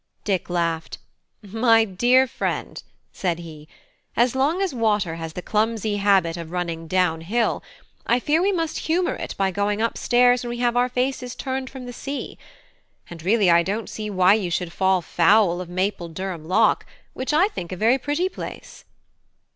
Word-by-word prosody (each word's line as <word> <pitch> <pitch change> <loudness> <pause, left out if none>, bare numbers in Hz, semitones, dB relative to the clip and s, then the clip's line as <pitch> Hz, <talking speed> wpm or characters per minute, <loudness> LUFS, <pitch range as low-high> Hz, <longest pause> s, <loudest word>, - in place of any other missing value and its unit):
Dick 190 -4 -1
laughed. 170 -2 -2 0.5
"My 225 +2 +3
dear 245 +7 +3
friend," 255 - -4 0.3
said 175 -3 -1
he, 155 -3 -11 0.5
"as 240 +1 +3
long 290 +7 +1
as 390 -5 -1
water 210 -7 +1
has 165 -1 -6
the 180 - -6
clumsy 215 -1 0
habit 195 -4 +2
of 165 -2 -7
running 170 -2 -4
down 180 -2 +1
hill, 225 +8 0 0.5
I 240 - +3
fear 305 +6 +1
we 395 +2 +2
must 330 -4 -2
humour 350 +2 +1
it - - -6
by 195 -1 +1
going 205 +2 -1
up 230 +1 -1
stairs 245 0 +4
when 240 - -5
we 240 - -4
have 240 0 +1
our 245 +1 +2
faces 250 0 -2
turned 260 -1 -4
from 265 -2 -9
the 245 - -7
sea. 280 +3 -6 0.7
And 170 -2 -8
really 195 +1 +3
I 170 0 +6
don't 205 +6 -3
see 215 -1 -5
why 185 -1 +4
you 205 -4 0
should 175 0 -2
fall 190 -2 +2
foul 175 +1 +3
of 180 - -8
Maple 185 -1 -2
Durham 175 -1 -5
lock, 215 +5 +3 0.3
which 260 - -3
I 345 +7 +4
think 175 - -7
a - - -3
very 230 +7 +3
pretty 295 +7 0
place." 375 - -9
210 Hz, 180 wpm, -23 LUFS, 175-245 Hz, 0.7 s, I